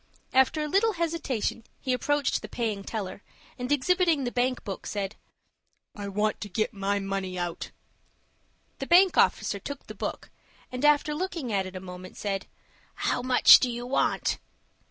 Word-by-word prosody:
After 265 Hz, +4 st, +3 dB
a -, -, -2 dB
little 415 Hz, +7 st, +2 dB
hesitation, 330 Hz, -, -2 dB, 0.2 s
he 260 Hz, -2 st, -1 dB
approached 290 Hz, +2 st, 0 dB
the -, -, -8 dB
paying 215 Hz, -4 st, -2 dB
teller, 200 Hz, -3 st, -5 dB, 0.4 s
and, 250 Hz, +2 st, -3 dB
exhibiting 330 Hz, +1 st, +3 dB
the 245 Hz, -, -2 dB
bank 250 Hz, +1 st, 0 dB
book, 195 Hz, -3 st, -6 dB
said, 200 Hz, 0 st, -3 dB, 0.8 s
"I 205 Hz, -3 st, -5 dB
want 210 Hz, +2 st, -1 dB
to 205 Hz, -, -5 dB
get 215 Hz, +4 st, -1 dB
my 200 Hz, 0 st, -1 dB
money 195 Hz, -2 st, -3 dB
out." 175 Hz, -1 st, -4 dB, 1.1 s
The 270 Hz, -, -4 dB
bank 365 Hz, +2 st, +6 dB
officer -, -, +2 dB
took 285 Hz, -1 st, -7 dB
the -, -, -8 dB
book, -, -, -5 dB, 0.4 s
and, 250 Hz, +2 st, -5 dB
after 295 Hz, 0 st, +4 dB
looking 330 Hz, -, -3 dB
at 190 Hz, -1 st, 0 dB
it 185 Hz, -, -10 dB
a -, -, -4 dB
moment, 185 Hz, 0 st, -10 dB
said, 195 Hz, -1 st, -3 dB, 0.5 s
"How -, -, 0 dB
much 250 Hz, 0 st, +8 dB
do 255 Hz, -, 0 dB
you 240 Hz, 0 st, -4 dB
want?" 255 Hz, -, 0 dB
245 Hz, 165 wpm, -27 LUFS, 200-290 Hz, 1.1 s, much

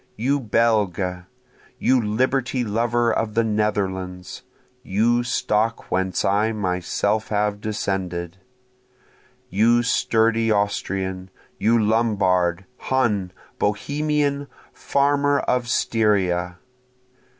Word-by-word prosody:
You 135 Hz, +6 st, 0 dB
Belge! 105 Hz, -6 st, 0 dB, 0.5 s
you 130 Hz, -1 st, +2 dB
liberty 125 Hz, +4 st, 0 dB
lover 115 Hz, +1 st, +1 dB
of 110 Hz, -1 st, -2 dB
the 115 Hz, -, +3 dB
Netherlands! 95 Hz, -4 st, -2 dB, 0.4 s
(you 115 Hz, +5 st, +1 dB
stock 115 Hz, -2 st, -1 dB
whence 95 Hz, -1 st, 0 dB
I 105 Hz, +3 st, +2 dB
myself 100 Hz, +2 st, -1 dB
have 105 Hz, -1 st, -1 dB
descended;) 95 Hz, -5 st, -3 dB, 1.1 s
You 115 Hz, +5 st, +3 dB
sturdy 115 Hz, -1 st, +2 dB
Austrian! 95 Hz, -2 st, -1 dB, 0.3 s
you 115 Hz, +2 st, +3 dB
Lombard! 100 Hz, -5 st, +1 dB
Hun! 105 Hz, -8 st, 0 dB, 0.3 s
Bohemian! 145 Hz, +6 st, -1 dB, 0.3 s
farmer 145 Hz, 0 st, +1 dB
of 125 Hz, -1 st, 0 dB
Styria! 95 Hz, -7 st, +1 dB
105 Hz, 85 wpm, -22 LUFS, 95-120 Hz, 1.1 s, the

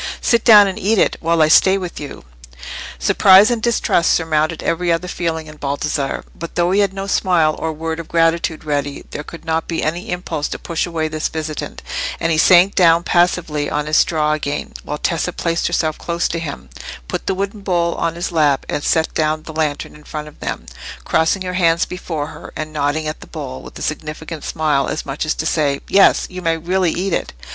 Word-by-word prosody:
"Sit 235 Hz, -2 st, +2 dB
down 210 Hz, -3 st, +8 dB
and 190 Hz, -, -4 dB
eat 215 Hz, +4 st, +1 dB
it, -, -, +3 dB
while 165 Hz, -1 st, +2 dB
I -, -, +4 dB
stay 190 Hz, +5 st, +5 dB
with 180 Hz, -3 st, -6 dB
you." 145 Hz, -, -8 dB, 0.7 s
Surprise 190 Hz, -, +6 dB
and 235 Hz, -2 st, -1 dB
distrust 220 Hz, -6 st, +2 dB
surmounted 160 Hz, 0 st, 0 dB
every 170 Hz, +1 st, 0 dB
other 170 Hz, +2 st, 0 dB
feeling 165 Hz, -3 st, -3 dB
in 155 Hz, 0 st, -12 dB
Baldassarre, 140 Hz, 0 st, -2 dB
but 170 Hz, -, -8 dB
though 175 Hz, 0 st, +2 dB
he 195 Hz, -, +3 dB
had 200 Hz, -2 st, +2 dB
no 195 Hz, 0 st, -5 dB
smile 175 Hz, -5 st, +2 dB
or 160 Hz, -, -2 dB
word 160 Hz, +1 st, -4 dB
of 165 Hz, -, -7 dB
gratitude 165 Hz, -1 st, +1 dB
ready, 145 Hz, -2 st, -3 dB
there -, -, -5 dB
could 165 Hz, +2 st, -11 dB
not 160 Hz, 0 st, -1 dB
be 165 Hz, -, -2 dB
any 170 Hz, +3 st, -2 dB
impulse 180 Hz, -4 st, -3 dB
to -, -, -5 dB
push 170 Hz, 0 st, -2 dB
away 160 Hz, -2 st, -2 dB
this 155 Hz, 0 st, -2 dB
visitant, 155 Hz, -2 st, -5 dB, 0.4 s
and 165 Hz, -, 0 dB
he 160 Hz, -, +2 dB
sank 180 Hz, +4 st, +6 dB
down 170 Hz, -2 st, +4 dB
passively 175 Hz, -5 st, +1 dB
on 150 Hz, 0 st, -1 dB
his 155 Hz, 0 st, 0 dB
straw 155 Hz, -2 st, +2 dB
again, 145 Hz, -1 st, -3 dB
while 150 Hz, -, -4 dB
Tessa 170 Hz, +3 st, -1 dB
placed 170 Hz, -1 st, -1 dB
herself 160 Hz, -2 st, -1 dB
close 170 Hz, 0 st, -1 dB
to 170 Hz, -, -2 dB
him, 140 Hz, -, -7 dB, 0.4 s
put -, -, -4 dB
the 190 Hz, -, +1 dB
wooden 200 Hz, +2 st, -3 dB
bowl 175 Hz, -3 st, 0 dB
on 165 Hz, 0 st, -2 dB
his 175 Hz, +2 st, -3 dB
lap, 150 Hz, -5 st, +2 dB
and 145 Hz, -, -3 dB
set 160 Hz, -1 st, +1 dB
down 155 Hz, 0 st, 0 dB
the 160 Hz, -, -9 dB
lantern 155 Hz, -2 st, -2 dB
in 150 Hz, -, -15 dB
front 150 Hz, 0 st, -6 dB
of 150 Hz, -, -14 dB
them, -, -, -4 dB, 0.4 s
crossing 160 Hz, +4 st, +1 dB
her 180 Hz, 0 st, -4 dB
hands 170 Hz, -2 st, +2 dB
before 165 Hz, -5 st, -4 dB
her, 160 Hz, -, -10 dB
and 155 Hz, 0 st, -5 dB
nodding 150 Hz, +1 st, -1 dB
at 155 Hz, -, -4 dB
the -, -, -12 dB
bowl 65 Hz, 0 st, -7 dB
with -, -, -11 dB
a -, -, -6 dB
significant 155 Hz, +1 st, -5 dB
smile, 150 Hz, -4 st, 0 dB
as -, -, -3 dB
much 140 Hz, +3 st, -3 dB
as -, -, +1 dB
to 160 Hz, -, -3 dB
say, 145 Hz, -4 st, +1 dB
"Yes, 195 Hz, -, +5 dB
you 185 Hz, 0 st, -8 dB
may 165 Hz, -1 st, +1 dB
really 180 Hz, +2 st, 0 dB
eat 185 Hz, 0 st, -2 dB
it." -, -, -2 dB
165 Hz, 215 wpm, -18 LUFS, 155-180 Hz, 0.7 s, down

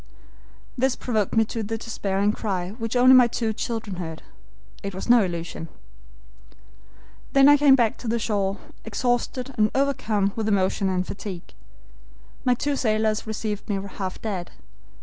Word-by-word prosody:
"This 265 Hz, 0 st, +2 dB
provoked 215 Hz, -5 st, -1 dB
me 225 Hz, 0 st, +4 dB
to 225 Hz, +1 st, -4 dB
the 220 Hz, +1 st, -3 dB
despairing 205 Hz, -2 st, -1 dB
cry, 190 Hz, -5 st, -3 dB
which 225 Hz, +1 st, -3 dB
only 255 Hz, +1 st, +7 dB
my 250 Hz, -2 st, +8 dB
two 225 Hz, -1 st, -2 dB
children 220 Hz, -3 st, -4 dB
heard. 160 Hz, -3 st, -6 dB, 0.6 s
It 200 Hz, -1 st, -5 dB
was 190 Hz, -, -5 dB
no 240 Hz, -3 st, +6 dB
illusion. 170 Hz, -2 st, -5 dB, 1.7 s
"Then 275 Hz, 0 st, +7 dB
I 290 Hz, -, +8 dB
came 285 Hz, -2 st, +6 dB
back 235 Hz, -4 st, +1 dB
to 245 Hz, -, -8 dB
the 230 Hz, +1 st, +1 dB
shore, 205 Hz, -3 st, -1 dB, 0.3 s
exhausted 245 Hz, +3 st, -1 dB
and 215 Hz, 0 st, +4 dB
overcome 225 Hz, -7 st, +1 dB
with 220 Hz, -2 st, -2 dB
emotion 195 Hz, -1 st, +1 dB
and 185 Hz, 0 st, 0 dB
fatigue. 190 Hz, -3 st, -7 dB, 0.9 s
My 250 Hz, -1 st, +3 dB
two 285 Hz, +3 st, -1 dB
sailors 215 Hz, -3 st, 0 dB
received 215 Hz, -1 st, -4 dB
me 200 Hz, -1 st, 0 dB, 0.2 s
half 190 Hz, -2 st, -4 dB
dead. 190 Hz, -5 st, -4 dB
220 Hz, 150 wpm, -24 LUFS, 195-245 Hz, 1.7 s, my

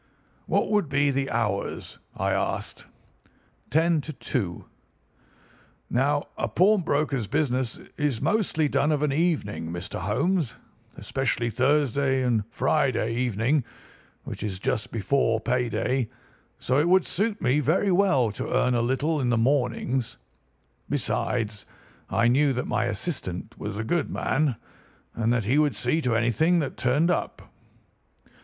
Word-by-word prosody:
"'What -, -, +1 dB
would 205 Hz, -8 st, +2 dB
be 140 Hz, 0 st, +2 dB
the 135 Hz, 0 st, -1 dB
hours?' 105 Hz, -4 st, -2 dB, 0.2 s
I -, -, 0 dB
asked. -, -, -2 dB, 0.8 s
"'Ten 160 Hz, +1 st, +3 dB
to 155 Hz, -, -7 dB
two.' 120 Hz, -7 st, -3 dB, 1.3 s
"Now 145 Hz, +4 st, +2 dB, 0.2 s
a -, -, 0 dB
pawnbroker's 155 Hz, -, +2 dB
business 130 Hz, -4 st, 0 dB, 0.2 s
is 145 Hz, -6 st, 0 dB
mostly 165 Hz, -2 st, +1 dB
done 145 Hz, +1 st, +1 dB
of 150 Hz, -1 st, +1 dB
an 145 Hz, -2 st, +1 dB
evening, 120 Hz, -, -1 dB
Mr. 90 Hz, +1 st, -5 dB
Holmes, 140 Hz, -, 0 dB, 0.4 s
especially 125 Hz, -3 st, -1 dB
Thursday 135 Hz, +1 st, +2 dB
and 120 Hz, -4 st, +1 dB
Friday 120 Hz, -3 st, +1 dB
evening, 120 Hz, +4 st, +1 dB, 0.6 s
which -, -, -7 dB
is 100 Hz, -3 st, -3 dB
just 110 Hz, +3 st, -2 dB
before 115 Hz, +1 st, +1 dB
pay 125 Hz, +2 st, 0 dB
day; 125 Hz, -1 st, -1 dB, 0.5 s
so 130 Hz, +2 st, +1 dB
it 160 Hz, +4 st, +2 dB
would 185 Hz, 0 st, +5 dB
suit 210 Hz, +3 st, -1 dB
me 135 Hz, +2 st, +2 dB
very 170 Hz, +7 st, +2 dB
well 175 Hz, -, +3 dB
to 100 Hz, -, -5 dB
earn 125 Hz, -, +2 dB
a 120 Hz, -, +2 dB
little 140 Hz, +6 st, 0 dB
in 125 Hz, -, 0 dB
the 120 Hz, -, +2 dB
mornings. 125 Hz, 0 st, 0 dB, 0.7 s
Besides, 110 Hz, -4 st, -2 dB, 0.4 s
I 115 Hz, -, +2 dB
knew 135 Hz, +3 st, +3 dB
that 125 Hz, -, -2 dB
my 125 Hz, 0 st, 0 dB
assistant 110 Hz, -, -4 dB
was 105 Hz, 0 st, -5 dB
a 110 Hz, -, -2 dB
good 165 Hz, +6 st, 0 dB
man, 145 Hz, -3 st, 0 dB, 0.6 s
and 115 Hz, 0 st, 0 dB
that 120 Hz, -4 st, +1 dB
he 130 Hz, +8 st, +3 dB
would 150 Hz, -1 st, +2 dB
see 160 Hz, -, 0 dB
to 125 Hz, -5 st, +1 dB
anything 120 Hz, +10 st, +2 dB
that 150 Hz, -5 st, -1 dB
turned 145 Hz, +8 st, +2 dB
up. -, -, -4 dB
130 Hz, 140 wpm, -26 LUFS, 115-150 Hz, 1.3 s, would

